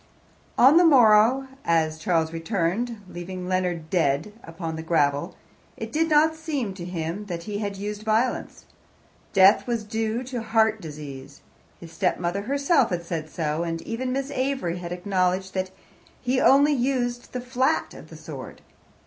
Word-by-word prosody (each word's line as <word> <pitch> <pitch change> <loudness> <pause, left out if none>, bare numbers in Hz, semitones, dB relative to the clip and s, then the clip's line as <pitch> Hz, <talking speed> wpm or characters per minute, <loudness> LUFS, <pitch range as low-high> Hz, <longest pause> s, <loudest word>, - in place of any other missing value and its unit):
On 270 +6 +7
the 350 - +7
morrow, 250 -3 +5 0.2
as 160 -1 +1
Charles 165 -1 0
returned, 200 +6 -2
leaving 180 +1 -7
Leonard 180 -3 -1
dead 160 +2 +1
upon 165 -1 -6
the 160 - -5
gravel, 145 -3 0 0.4
it - - -6
did 325 +1 +1
not 310 +1 +4
seem 300 -10 -3
to 180 -2 -8
him 175 +3 -4
that 170 -3 -5
he 205 +1 -4
had 200 -2 -3
used 205 +1 -5
violence. 220 +3 -1 0.7
Death 195 +3 +5
was 235 -3 -1
due 220 +2 -2
to 250 -2 -5
heart 220 -1 +2
disease. 145 -3 -9 0.4
His 165 -1 -11
stepmother 180 0 -1
herself 280 - +2
had 170 -1 -3
said 160 -2 -4
so, 155 0 -2
and 165 -1 -2
even 255 +3 -3
Miss 275 +2 -2
Avery 260 -10 -1
had 175 -1 -7
acknowledged 185 0 -1
that 185 0 -2 0.5
he 255 +1 0
only 285 +2 +5
used 245 -2 -1
the 250 - -3
flat 260 +4 0
of - - -12
the - - -11
sword. - - -9
200 Hz, 155 wpm, -25 LUFS, 170-250 Hz, 0.7 s, On